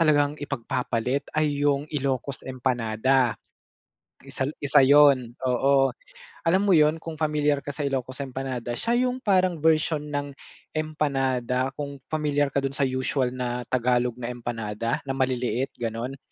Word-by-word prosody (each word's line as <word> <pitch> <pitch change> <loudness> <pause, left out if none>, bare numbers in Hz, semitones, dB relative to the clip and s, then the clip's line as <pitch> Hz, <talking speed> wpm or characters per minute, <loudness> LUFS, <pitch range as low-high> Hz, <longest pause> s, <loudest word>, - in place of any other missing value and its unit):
talagang 150 -2 +3
ipagpapalit 125 0 -2
ay 150 -2 +1
'yung 140 0 +1
Ilocos 135 -1 -2
empanada. 125 0 +1 0.8
Isa 135 - -4 0.2
isa 145 -1 +5
'yun, 140 -3 +5 0.2
oo. 135 +2 +3 0.5
Alam 185 +4 +3
mo 195 - +5
'yun 155 0 +4
kung 165 0 -7
pamilyar 150 -2 +1
ka 145 - -6
sa 145 0 -3
Ilocos 130 -2 -3
empanada, 130 -3 -4
siya 240 - +1
'yung 255 +1 -3
parang 185 - +2
version 155 -1 +2
ng 145 -1 -4 0.4
empanada 135 -5 0
kung 140 -2 -6
pamilyar 145 -2 +1
ka 140 - -1
dun 135 0 -1
sa 145 - -1
usual 130 0 0
na 125 -1 -3
Tagalog 125 -1 +1
na 120 - -4
empanada, 115 -1 -3
na 135 - -2
maliliit 130 0 0
gano'n. 120 +3 -4
135 Hz, 140 wpm, -25 LUFS, 125-150 Hz, 0.8 s, isa